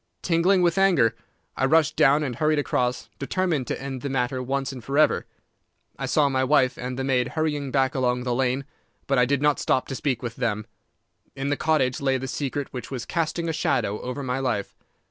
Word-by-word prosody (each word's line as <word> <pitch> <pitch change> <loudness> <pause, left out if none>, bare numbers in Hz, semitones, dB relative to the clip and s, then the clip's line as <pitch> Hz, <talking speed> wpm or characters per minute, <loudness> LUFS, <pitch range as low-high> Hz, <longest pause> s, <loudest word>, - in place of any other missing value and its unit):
Tingling 180 +2 +3
with 175 +1 +2
anger, 175 - +4 0.4
I 130 - +1
rushed 155 +2 +3
down 145 +3 +4
and 130 -5 -3
hurried 155 0 +2
across, 125 -3 -1
determined 150 -2 -1
to - - -3
end 135 -2 -5
the 140 - -3
matter 130 0 -1
once 135 +1 -2
and 130 -3 -9
forever. 145 +4 +2 0.7
I - - -2
saw 150 -2 +3
my 130 -1 +1
wife 130 -2 +3
and 125 +1 -5
the 135 - -2
maid 130 -2 +1
hurrying 150 -3 -2
back 130 0 +1
along 125 -2 0
the 125 -1 -1
lane, 130 +2 0 0.4
but 135 -2 +2
I 125 - +5
did 140 +2 0
not 150 -1 +3
stop 130 - +1
to 135 - -3
speak 130 -4 -2
with 115 -1 -5
them. 110 -4 -1 0.7
In 135 0 -2
the 145 - +1
cottage 140 -6 +1
lay 135 -1 +2
the 130 +1 -5
secret 140 +1 -3
which 125 -3 -6
was 125 -4 -5
casting 170 0 -1
a 165 - -1
shadow 105 -8 0
over 125 +3 -4
my 130 0 -1
life. 120 -7 -2
135 Hz, 205 wpm, -25 LUFS, 125-150 Hz, 0.7 s, I